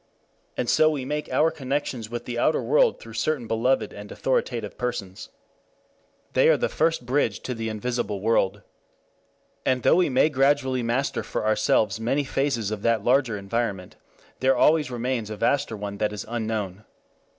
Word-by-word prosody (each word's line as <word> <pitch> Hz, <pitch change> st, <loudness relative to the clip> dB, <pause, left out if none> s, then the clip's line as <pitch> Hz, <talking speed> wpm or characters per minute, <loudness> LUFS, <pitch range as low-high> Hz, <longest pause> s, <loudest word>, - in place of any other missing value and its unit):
And 120 Hz, -, -1 dB
so 155 Hz, +5 st, +4 dB
we 145 Hz, -4 st, -3 dB
make 150 Hz, +2 st, -3 dB
our 160 Hz, +1 st, +3 dB
connections 135 Hz, -6 st, -3 dB
with 120 Hz, 0 st, -5 dB
the 120 Hz, -1 st, -3 dB
outer 155 Hz, -, +2 dB
world -, -, +3 dB
through 115 Hz, -, -11 dB
certain 125 Hz, +3 st, -1 dB
beloved 115 Hz, +4 st, 0 dB
and 105 Hz, 0 st, -10 dB
authoritative 120 Hz, -5 st, -1 dB
persons. 120 Hz, -7 st, -4 dB, 1.0 s
They -, -, +5 dB
are -, -, +5 dB
the -, -, 0 dB
first 160 Hz, -5 st, 0 dB
bridge 125 Hz, -5 st, 0 dB
to 125 Hz, -, -4 dB
the 115 Hz, -1 st, -4 dB
invisible 110 Hz, -2 st, -2 dB
world. 105 Hz, -1 st, +1 dB, 1.0 s
And 130 Hz, -2 st, +1 dB
though -, -, +5 dB
we 180 Hz, -3 st, +3 dB
may 135 Hz, +4 st, +3 dB
gradually 135 Hz, -2 st, +2 dB
master 120 Hz, +4 st, -1 dB
for -, -, -4 dB
ourselves 110 Hz, -1 st, +2 dB
many 130 Hz, +6 st, 0 dB
phases 130 Hz, -6 st, -1 dB
of 105 Hz, -2 st, -4 dB
that 115 Hz, -2 st, +1 dB
larger 125 Hz, -3 st, +2 dB
environment, 100 Hz, -2 st, -3 dB, 0.4 s
there 130 Hz, 0 st, +3 dB
always 150 Hz, 0 st, +4 dB
remains 120 Hz, -2 st, -2 dB
a 110 Hz, -, -5 dB
vaster 140 Hz, -1 st, 0 dB
one 100 Hz, -1 st, -6 dB
that 105 Hz, -1 st, +1 dB
is 105 Hz, -, -6 dB
unknown. 110 Hz, -4 st, -3 dB
120 Hz, 165 wpm, -25 LUFS, 110-135 Hz, 1.0 s, They